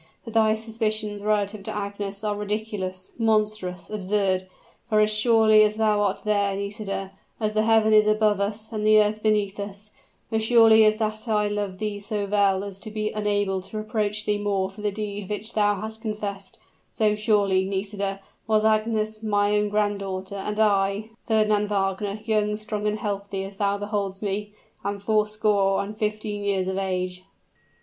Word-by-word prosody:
But 230 - -8
thy 220 -1 +4
suspicions 215 -2 -2
relative 210 0 0
to 200 - -5
Agnes 200 0 -5
are 210 -1 0
ridiculous, 205 -3 -4
monstrous, 215 -5 0
absurd. 195 -2 0 0.4
For, 215 - +3
as 215 0 +4
surely 215 -1 +5
as 210 0 +3
thou 215 -2 +2
art 200 -1 0
there, 200 -2 +1
Nisida 200 -1 -4 0.3
as 215 -1 -1
the 215 - +2
heaven 220 0 +4
is 215 0 +6
above 215 -1 +3
us 210 +2 -3
and 215 -1 -2
the 215 0 +6
earth 210 0 +1
beneath 210 -2 +1
us 200 +1 -7 0.4
as 220 0 +1
surely 225 -1 +6
as 215 0 +4
that 215 +1 -3
I 210 -2 +2
love 205 -2 -3
thee 210 0 -3
so 205 0 -3
well 200 -1 +2
as 200 -1 -7
to 210 - -5
be 215 0 -2
unable 205 -2 0
to 195 +3 -8
reproach 215 -1 -1
thee 205 0 0
more 195 -2 -1
for 205 +2 -11
the 210 - 0
deed 205 -1 -5
which 210 +2 -4
thou 205 -1 +3
hast 220 +2 -6
confessed 205 -3 -5 0.3
so 215 -1 +2
surely, 205 -3 +2
Nisida, 195 0 -3 0.3
was 215 -1 +3
Agnes 215 0 +1
my 205 -1 +1
own 210 0 +1
granddaughter, 200 -2 -2
and 210 +2 -3
I 220 - +6
I, 200 +1 +1 0.2
Fernand 215 -2 +2
Wagner 200 +1 -1
young, 210 -2 +1
strong, 210 -1 -3
and 210 0 0
healthy 200 -2 -3
as 195 0 -9
thou 200 0 +1
beholdest 205 -1 -3
me, 205 +1 -3 0.3
am 200 +1 -2
fourscore 210 -1 +1
and 210 +2 -7
fifteen 210 -1 -3
years 195 -2 +1
of 190 +1 -2
age." 185 -1 -2
210 Hz, 175 wpm, -25 LUFS, 200-215 Hz, 0.4 s, is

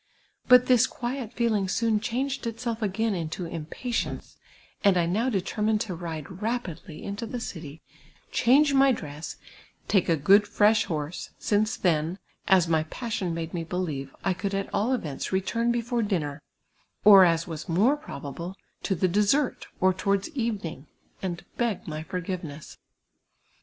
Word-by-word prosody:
But 250 -1 +8
this 250 -3 +5
quiet 245 -1 -4
feeling 225 -5 +1
soon 225 +2 +1
changed 255 +3 -2
itself 230 0 -3
again 220 +2 0
into 170 0 -3
impatience, 170 +9 -4 0.5
and 195 -2 +5
I 170 - +3
now 215 +9 +1
determined 210 +1 0
to 215 -5 -3
ride 170 +1 -6
rapidly 190 -9 -4
into 205 +3 -4
the 245 +2 -4
city, 160 -8 -7 0.5
change 280 +4 +4
my 270 0 +6
dress, 150 - -5 0.5
take 190 -4 +2
a 165 - +5
good, 200 +8 +5
fresh 215 +2 +4
horse, 155 0 -4
since 215 +1 +1
then, 165 0 +1 0.3
as 185 -3 +5
my 160 -1 +3
passion 190 -3 -3
made 165 -1 -4
me 170 -2 -2
believe, 155 -6 -4
I 190 - +2
could 195 +2 -3
at 195 0 -3
all 220 +5 +1
events 150 - -4
return 230 +5 +1
before 240 0 0
dinner, 155 -9 -2 0.6
or, 200 -2 +10
as 165 -2 +3
was 160 -1 -7
more 210 - +4
probable, 170 - -7 0.3
to 195 - 0
the 185 +2 +2
dessert, 210 +9 +1
or 185 0 +4
towards 200 - 0
evening, 215 - -3 0.3
and 175 -2 -4
beg 235 -5 -1
my 155 -1 -4
forgiveness. 175 -4 -6
195 Hz, 150 wpm, -27 LUFS, 165-230 Hz, 0.6 s, or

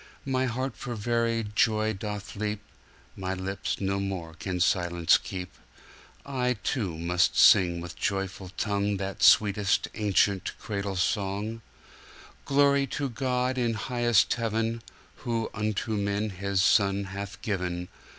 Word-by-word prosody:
My 130 -1 0
heart 130 +1 -3
for 120 -2 -5
very 115 +1 0
joy 110 0 +2
doth 105 0 -6
leap, 105 0 -3 0.5
My 95 0 -3
lips 95 +1 -3
no 95 0 -1
more 95 -4 -4
can 90 +2 -4
silence 85 -1 +3
keep;I 100 - -6
too 100 - -1
must 90 +1 +1
sing 90 -4 +6
with 85 0 -8
joyful 95 -1 -2
tongueThat 100 -1 -1
sweetest 100 0 +4
ancient 100 -2 +1
cradle 100 -2 -4
song—Glory 115 +8 -1
to 140 +1 -3
God 125 +1 -1
in 120 -2 +1
highest 120 -1 +2
Heaven, 115 0 -1 0.4
Who 115 -3 -2
unto 110 0 -2
man 100 0 -1
His 100 0 0
Son 100 -1 +3
hath 100 +1 -7
given! 90 -4 -2
100 Hz, 120 wpm, -27 LUFS, 95-115 Hz, 0.5 s, sing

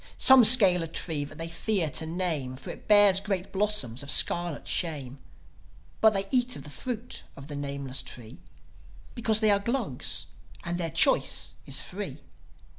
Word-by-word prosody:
Some 265 -2 +6
scale 205 -6 +7
a 165 - -4
tree 160 -2 -2
that 150 +2 -13
they 165 +1 -6
fear 170 +1 0
to 160 - -2
name, 160 -7 -4
For 130 - -9
it - - -14
bears 205 -2 +5
great 195 -2 -5
blossoms 190 - -2
of 140 - -9
scarlet 175 +1 +2
shame. 145 -6 -4 0.8
But 220 -1 +4
they 195 0 -2
eat 250 -1 0
of - - -10
the 150 - -10
fruit 245 - -7
of 135 - -12
the 145 0 -9
nameless 140 -1 -5
tree, 120 +1 -10 0.7
Because 225 -3 +1
they 215 -1 +3
are 200 - +2
Glugs, 215 - -1 0.4
and 175 +1 -5
their 165 -2 -3
choice - - +1
is - - -4
free. - - -8
175 Hz, 170 wpm, -26 LUFS, 145-210 Hz, 0.8 s, scale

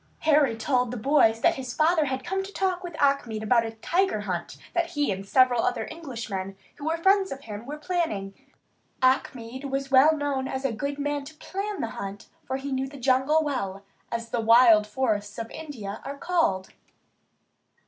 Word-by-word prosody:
Harry 290 -7 +3
told 250 +1 +1
the 250 - -4
boys 225 -2 +3
that - - +3
his 255 -2 -5
father 320 0 +3
had 260 -1 -3
come 385 +2 -1
to 385 +1 -8
talk 375 -2 -1
with 345 -3 -7
Achmed 250 -6 +1
about 230 +1 +3
a 225 - -3
tiger 340 - 0
hunt 180 -4 -4 0.2
that 345 -1 +1
he 295 -6 0
and 195 0 -4
several 255 0 +4
other 245 - -1
Englishmen, 225 - -5 0.2
who 285 - -8
were 325 +1 0
friends 385 +3 +3
of 275 - -6
his, 210 -5 -7
were 295 +3 -6
planning. 300 - -2 0.7
Achmed 255 0 0
was 275 0 -3
well 295 +4 +6
known 280 -2 -1
as 265 +1 -4
a 270 - +2
good 280 +5 -3
man 290 0 -2
to 310 +2 -11
plan 395 +5 -4
a 230 - -2
hunt, 200 +1 -7 0.2
for 265 - -2
he 275 +1 -5
knew 265 0 -1
the 280 +1 -11
jungle 265 +4 +3
well, 200 -10 -3 0.3
as 230 0 -3
the 235 - -1
wild 225 -2 +6
forests 210 -4 -1
of 230 0 -5
India 240 -11 -7
are 280 +1 -6
called. 325 - 0
265 Hz, 190 wpm, -26 LUFS, 225-305 Hz, 0.7 s, well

